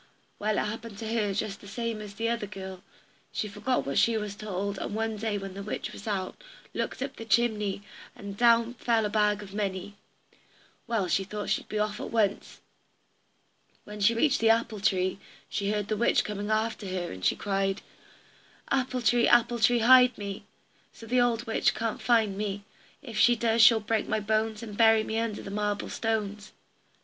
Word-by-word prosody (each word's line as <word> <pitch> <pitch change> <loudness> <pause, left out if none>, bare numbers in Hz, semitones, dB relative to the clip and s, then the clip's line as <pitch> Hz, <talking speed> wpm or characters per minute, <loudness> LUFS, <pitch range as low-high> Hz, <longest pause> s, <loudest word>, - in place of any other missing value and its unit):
Well, 210 0 0
it - - +1
happened 220 0 -6
to 220 +1 -4
her 210 -3 +1
just 200 0 -3
the 200 - -12
same 230 +1 -3
as 205 -1 -8
to - - -22
the 230 0 0
other 230 -3 -2
girl 190 -2 -8 0.5
she 215 - -2
forgot 250 +5 -1
what 140 - +1
she 230 -1 +3
was 210 -2 -4
told, 200 -1 -4
and 205 - -4
one 225 0 -1
day 215 0 -2
when 195 -1 -6
the 200 - -7
witch 205 - -5
was 205 - -10
out, 195 - -3 0.3
looked - - -3
up 270 - -6
the - - -6
chimney, 210 -2 +1 0.3
and 200 -1 -8
down 235 +1 +4
fell 230 -2 +1
a - - -1
bag 210 0 +1
of 195 -1 -12
money. 200 -1 -3 0.9
Well, 225 -6 0
she 195 - +1
thought 205 +2 -5
she - - +1
would - - -20
be 215 - -3
off 210 0 -1
at - - -5
once. 210 -3 -1 1.2
When 210 0 -9
she 220 +3 +4
reached 280 +4 +2
the 225 - +3
apple 225 -2 +2
tree, 190 -2 +1 0.3
she 200 -1 -2
heard 210 -1 -1
the 215 - 0
witch 235 +3 +3
coming 205 0 -4
after 220 -1 -1
her, 185 -2 -3
and 95 0 -9
she - - +3
cried: 195 -1 -1 0.9
"Apple 255 -2 0
tree, 235 +1 +4
apple 240 0 +4
tree, 235 +2 +4
hide 250 +1 +7
me, 200 -1 -6 0.5
So 230 - -13
the 245 +2 +2
old 240 -1 +1
witch 225 - +1
can't 225 0 -3
find 225 -5 +2
me; 200 0 -3 0.4
If 230 -5 -5
she 240 0 +6
does 230 0 +2
she'll 220 +1 +8
break 215 0 -1
my 215 - 0
bones, 215 +1 -1
And 210 -3 -7
bury 225 0 +5
me 220 +1 -2
under 225 -2 -3
the 195 - -7
marble 205 0 -2
stones." 210 -2 -3
215 Hz, 200 wpm, -28 LUFS, 200-230 Hz, 1.2 s, she'll